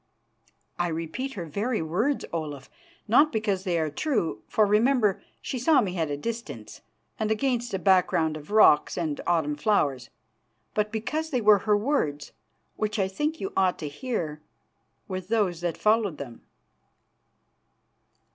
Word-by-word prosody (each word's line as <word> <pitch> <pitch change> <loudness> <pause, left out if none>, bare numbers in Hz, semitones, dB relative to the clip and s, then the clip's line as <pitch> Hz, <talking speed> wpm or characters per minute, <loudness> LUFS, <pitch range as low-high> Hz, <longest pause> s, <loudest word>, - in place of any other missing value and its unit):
"I 175 - +1
repeat 165 +12 -4
her 175 -4 -5
very 210 - -2
words, 215 - 0
Olaf, 150 -4 -5 0.4
not 285 +8 +5
because 210 -4 -1
they 175 -2 +1
are 155 -2 -1
true 170 - -1
for, 215 - +3
remember, 215 0 +3 0.2
she 255 - -3
saw 295 +5 +4
me 190 -6 -1
at 160 -2 0
a 145 - -2
distance 230 +9 -6 0.4
and 215 -1 0
against 240 +1 0
a - - +1
background 180 -4 +2
of 150 -1 -10
rocks 210 -8 +5
and 160 -4 -2
autumn 160 -4 +1
flowers 145 - 0 0.6
but 210 0 0
because 305 +9 -3
they 260 -5 0
were 210 -2 +6
her 210 - +5
words, 205 - -1 0.5
which 215 0 -1
I 195 -2 +1
think 295 +12 -2
you 390 +1 -4
ought 185 -1 +2
to 155 - -5
hear, 155 - -4 0.7
with 185 -2 -5
those 200 -6 0
that 175 -2 -2
followed 210 -6 +2
them." 120 -4 -8
200 Hz, 150 wpm, -26 LUFS, 160-230 Hz, 0.7 s, were